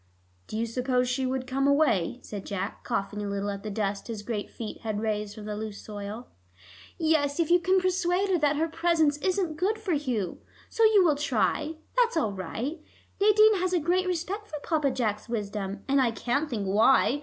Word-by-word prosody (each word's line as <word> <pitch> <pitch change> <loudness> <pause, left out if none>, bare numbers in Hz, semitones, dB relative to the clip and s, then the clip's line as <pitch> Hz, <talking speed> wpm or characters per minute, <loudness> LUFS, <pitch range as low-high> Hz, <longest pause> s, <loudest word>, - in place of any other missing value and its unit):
"Do 215 - -5
you 230 - 0
suppose 250 +2 0
she 255 +1 0
would 260 0 -2
come 270 +2 0
away?" 280 - +2
said 200 -2 -6
Jack, 195 0 -4
coughing 205 +1 -2
a 205 - -3
little 200 0 -2
at 200 0 -6
the 215 - -5
dust 200 -1 -2
his 220 -3 -5
great 210 -2 -3
feet 225 -2 -7
had 215 -2 -2
raised 210 -1 -2
from 215 - -9
the 210 0 -4
loose 215 -1 -5
soil. 210 +3 -7 0.7
"Yes, 310 -3 +1
if 335 -1 +1
you 350 - +6
can 370 +2 +3
persuade 370 +1 +1
her 360 - +3
that 295 -1 +2
her 320 +3 +1
presence 325 -2 +2
isn't 360 -1 -1
good 405 +6 +1
for 430 -5 -2
Hugh. 250 - -2 0.3
So 455 - +1
you 420 -4 +6
will 305 -4 +4
try; 295 +3 0 0.2
that's 475 -6 +3
all 220 -10 +1
right. 230 - -4 0.4
Nadine 425 +1 +6
has 370 0 0
a 355 - +3
great 360 +4 +1
respect 365 +4 -3
for 305 - -5
Papa 305 -4 +1
Jack's 220 -4 -2
wisdom, 200 -3 -4
and 275 0 +3
I 250 - +3
can't 265 +6 -1
think 215 -5 -2
why. 225 +7 +4
265 Hz, 200 wpm, -27 LUFS, 210-340 Hz, 0.7 s, you